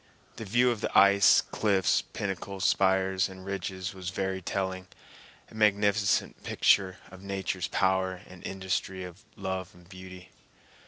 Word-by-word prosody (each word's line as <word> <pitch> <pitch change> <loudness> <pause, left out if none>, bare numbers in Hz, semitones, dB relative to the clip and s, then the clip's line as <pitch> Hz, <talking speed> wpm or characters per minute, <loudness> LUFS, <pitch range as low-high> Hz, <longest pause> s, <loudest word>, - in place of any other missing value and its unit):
The 110 - -6
view 120 +5 +3
of 115 -3 -4
the - - -1
ice 100 0 +6
cliffs, 100 -4 +1
pinnacles, 95 -1 -5
spires 95 0 +2
and 95 0 -11
ridges 95 -1 -4
was 95 -2 -6
very 95 0 -3
telling, 95 0 -3 0.6
a - - -15
magnificent 105 -1 +1
picture 95 -2 +2
of 95 0 -12
nature's 95 -2 -3
power 95 -1 0
and 90 -1 -14
industry 95 0 -3
and 90 -2 -8 0.2
love 95 -2 -5
of 90 0 -19
beauty. 95 -1 -11
95 Hz, 140 wpm, -28 LUFS, 95-100 Hz, 0.6 s, ice